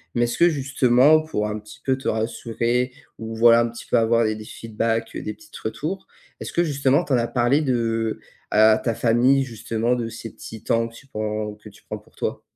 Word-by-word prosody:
Mais 120 - +2
est-ce 120 +5 -2
que 175 +1 +6
justement, 135 +1 +4
pour 105 -10 -2
un 105 0 -4
petit 105 +1 -14
peu 130 -1 +2
te 135 - -7
rassurer 115 +2 -1 0.3
ou 115 0 -6
voilà, 115 +1 +6
un 115 - 0
petit 120 - -10
peu - - +1
avoir 115 0 +3
des 110 0 0
des 110 - -8
feedbacks, 115 +1 -3
heu, - - -4
des 105 - -5
petites 160 0 -17
retours, 150 - -4 0.3
est-ce - - -6
que 175 - +2
justement 140 -3 +2
tu 140 - -2
en 125 - +5
as 115 - 0
parlé 125 +4 +2
de 115 -4 -1 0.3
à 110 +1 +5
ta 115 -2 0
famille 125 +4 +3
justement, 115 0 -2
de 120 -2 -2
ces 115 0 -8
petits 110 -1 -10
temps 115 0 +1
que 115 - -15
tu 140 - -14
prends 105 -2 -3
que 105 0 -14
tu 100 - -20
prends - - -6
pour - - -25
toi? - - -3
115 Hz, 225 wpm, -23 LUFS, 110-130 Hz, 0.3 s, que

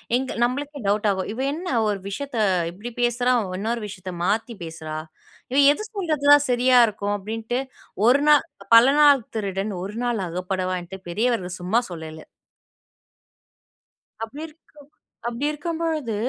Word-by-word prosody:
எங்க 260 +1 -2
நம்மளுக்கே 285 +4 -2
டவுட் 210 +1 +1
ஆகும்! 190 0 -3
"இவ 245 - -8
என்ன, 355 +4 -6 0.2
ஒரு 205 -2 -1
விஷயத்த 275 +3 -5 0.3
இப்படி 215 +7 -8
பேசுறா, 245 +1 +2 0.3
இன்னொரு 225 +3 -2
விஷயத்த 185 -2 -8
மாத்தி 225 +5 0
பேசுறா, 160 -1 -7 0.6
இவ 270 - 0 0.2
எது 430 - -6
சொல்றது 315 -8 -2
தான் 290 -1 +6
சரியா 250 +1 +5
இருக்கும்?" 205 -1 -2
அப்படின்ட்டு 225 +4 -3 0.5
ஒரு 275 +3 +5
நா 300 - +9 0.4
பல 230 +2 +9 0.2
நாள் 280 -6 +5
திருடன் 200 -1 -2
ஒரு 205 +3 -6
நாள் 225 -6 -1
அகப்படுவான்ட்டு 185 +1 -3
பெரியவர்கள் 190 -3 -1
சும்மா 215 +7 +2
சொல்லல! 160 -1 -8 2.0
அப்படி 275 +7 -7
இருக்கு 315 +1 -21 0.6
அப்படி 240 +4 -3
இருக்கும்பொழுது, 315 -6 -3
225 Hz, 135 wpm, -23 LUFS, 190-270 Hz, 2.0 s, நா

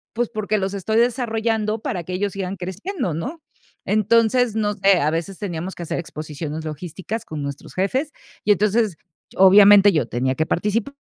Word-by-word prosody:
pues 240 0 0
porque, 215 0 -1
los 195 +1 -2
estoy 220 +3 -2
desarrollando 225 -3 0
para 195 -6 -3
que 180 - -7
ellos 200 +2 -1
sigan 195 0 -4
creciendo, 190 - -4
¿no? 260 - -5 0.4
Entonces, 225 +2 +2
no 210 -1 0
sé, 195 -2 +3
a 150 +2 +2
veces 170 +4 -4
teníamos 185 -2 -5
que 175 - -7
hacer - - -3
exposiciones 155 -1 -6
logísticas 175 +7 -6
con 155 -2 -6
nuestros 140 0 -7
jefes 260 +11 -1 0.3
y, 210 - +5
entonces, 210 -1 +1 0.4
obviamente 200 +1 +7
yo 150 -7 +1
tenía 130 +2 -1
que 155 - 0
participar, 210 +9 -1
200 Hz, 170 wpm, -21 LUFS, 170-220 Hz, 0.4 s, obviamente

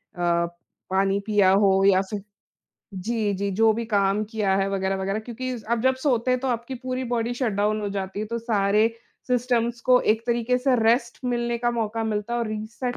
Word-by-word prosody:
अ, 170 -1 +1 0.4
पानी 195 +1 +1
पिया 205 -3 +4
हो 195 -1 +4
या 190 -1 +5
फिर 210 -2 -4 0.7
जी, 210 +2 -1
जी, 200 +1 -2
जो 220 +3 +3
भी 230 +2 -3
काम 200 -1 +1
किया 205 -4 +1
है 195 0 +1
वग़ैरह-वग़ैरह 195 +1 -1
क्योंकि 245 +3 -5
ज़ 220 - -11
आप 235 - +2
जब 260 +1 +3
सोते 255 -3 +1
हैं, 255 - +2
तो 265 - -2
आपकी 240 +2 -3
पूरी 255 0 -2
बॉडी 235 -1 -1
शट 245 -3 -1
डाउन 210 +2 0
हो 205 - -2
जाती 195 0 -4
है। 215 - -3
तो 235 +2 -3
सारे 215 -2 +2 0.4
सिस्टम्स 240 -1 0
को 250 +1 +4
एक 220 +1 -5
तरीके 240 +1 +1
से 260 0 +2
रेस्ट 235 +2 +2
मिलने 240 -1 -1
का 240 0 +1
मौका 225 -1 -2
मिलता 215 +1 -2
है - - 0
और 235 - -1
रीसेट 220 +4 -4
225 Hz, 205 wpm, -24 LUFS, 200-240 Hz, 0.7 s, या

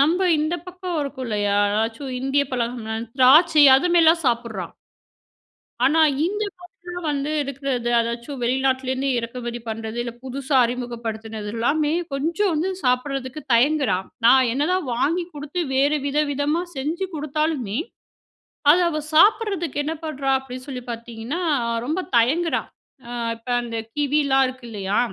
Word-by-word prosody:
நம்ப 325 +6 +3 0.2
இந்த 310 +3 0
பக்கம் 360 -2 -4
இருக்கும் 275 -2 -4
இல்லையா? 205 -2 0 0.2
எதாச்சும் 225 +5 -2
இந்திய 270 +2 +2
பழம்னா 235 -2 -2 0.2
திராட்சை 300 +4 +6
அது 290 +7 +1
மாரிலாம் 330 0 +5
சாப்பிடுறான். 230 -7 -2 1.1
ஆனா 315 +4 +3 0.3
இந்த 415 +4 -1 0.2
பக்கம் 355 - -11 0.4
வந்து 285 +1 -1
இருக்கிற 275 0 -6
எதா 240 0 -2
எதாச்சும், 235 +4 -5
வெளிநாட்டிலேருந்து 260 +1 0
இறக்குமதி 240 0 -4
பண்ணுறது. 225 +1 -5
இல்ல 235 - -5
புதுசா 270 +2 -3
அறிமுகப்படுத்துனது 225 -3 -5
எல்லாமே 295 +6 +1 0.2
கொஞ்சம் 335 +8 0
வந்து 320 +5 0
சாப்பிடுறதுக்கு 260 +2 -1
தயங்குறா. 260 -4 +3 0.3
நான் 260 0 +6
என்ன 285 +3 0
தான் 370 -5 0
வாங்கி 330 +8 +1
குடுத்து 295 +4 -4
வேறு 285 +3 +2
வித 285 +1 0
விதமா 290 +4 0
செஞ்சு 320 +8 -2
குடுத்தாலுமே, 300 -7 -2 0.9
அது 355 - +4
அவ 305 -2 -2
சாப்பிடுறதுக்கு 395 -3 +3
என்ன 315 - -2
பண்றா? 275 -3 -1
அப்படின்னு 255 0 -9
சொல்லி 255 -3 -6
பார்த்தீங்கன்னா, 235 +7 -5 0.4
ரொம்ப 315 +6 -1 0.2
தயங்குறா. 300 +9 +2 0.5
அ - - -7 0.3
இப்ப 230 +2 -13
அந்த 235 -1 -6 0.2
கிவிலாம் 280 -2 +2
இருக்கு 255 -1 -9
இல்லையா? 200 -2 -1
270 Hz, 135 wpm, -22 LUFS, 240-305 Hz, 1.1 s, திராட்சை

